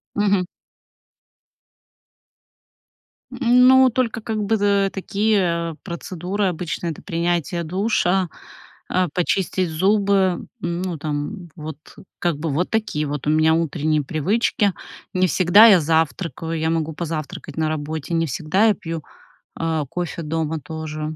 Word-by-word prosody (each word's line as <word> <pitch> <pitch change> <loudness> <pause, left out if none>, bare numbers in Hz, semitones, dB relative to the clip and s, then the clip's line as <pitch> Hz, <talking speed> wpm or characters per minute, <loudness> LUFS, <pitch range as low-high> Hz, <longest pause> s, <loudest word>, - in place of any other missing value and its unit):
Мгм. 200 -2 +2 2.9
М, 250 0 +5
ну, 260 0 +7
только 240 -1 -1
как 215 -1 -3
бы, 215 +2 +1
дэ 200 -1 +2
такие, 190 -4 0
э, - - -10
процедуры, 185 +2 -3
обычно 175 -1 -3
это 160 - -6
принятие 170 -1 -1
душа, 190 0 +1 0.6
а, 185 -1 +1
почистить 185 0 0
зубы, 195 +1 +2
ну, 175 -1 -3
там 155 +5 -4
вот 155 -2 -7 0.4
как 170 -4 0
бы, 160 +1 -2
вот 160 +6 -1
такие 215 -9 -1
вот 145 -1 -4
у - - +3
меня 155 +1 +4
утренние 155 -2 0
привычки. 200 - +1 0.4
Не 185 0 +3
всегда 185 +7 +7
я 200 -6 +7
завтракаю, 165 +1 -1
я 160 +1 0
могу 160 -1 -1
позавтракать 155 -3 -5
на 160 -1 0
работе, 155 +1 -3
не 165 0 +1
всегда 160 - +1
я 215 - +4
пью, 165 -1 -6 0.5
а, 160 -2 -1
кофе 175 +1 -4
дома 160 0 -2
тоже. 155 +1 -5
170 Hz, 130 wpm, -21 LUFS, 160-195 Hz, 2.9 s, ну